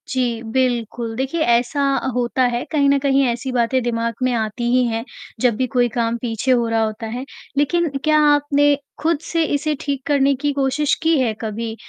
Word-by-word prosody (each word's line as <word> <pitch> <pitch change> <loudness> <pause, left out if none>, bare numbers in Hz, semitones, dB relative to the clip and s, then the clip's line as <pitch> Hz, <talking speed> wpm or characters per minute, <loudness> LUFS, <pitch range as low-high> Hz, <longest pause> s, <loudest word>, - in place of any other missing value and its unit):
जी, 245 -3 -1
बिल्कुल 235 -1 -1
देखिए 270 +7 -2
ऐसा 240 +1 +2 0.2
अ, - - -3
होता 245 +1 0
है 240 - -1
कहीं 285 -2 +3
न 280 - +4
कहीं 275 0 +2
ऐसी 240 +2 -2
बातें 250 +1 +1
दिमाग 230 -1 -1
में 255 - +2
आती 220 0 -2
ही 255 - +4
हैं, 225 0 -2 0.4
जब 240 -1 +2
भी 255 +3 -1
कोई 245 0 +1
काम 230 0 -1
पीछे 235 +1 -1
हो 240 -2 +3
रहा 225 0 +1
होता 220 +1 -4
है, 245 +4 -5 0.3
लेकिन 335 +4 +2
क्या 310 0 +4
आपने 290 0 +3 0.3
खुद 325 -1 +1
से 330 -1 0
इसे 300 +1 -1
ठीक 280 -2 -3
करने 280 -1 +3
की 290 - +1
कोशिश 280 +1 +1
की 325 0 +3
है 240 -4 +1
कभी? 220 0 -4
255 Hz, 195 wpm, -20 LUFS, 230-285 Hz, 0.4 s, न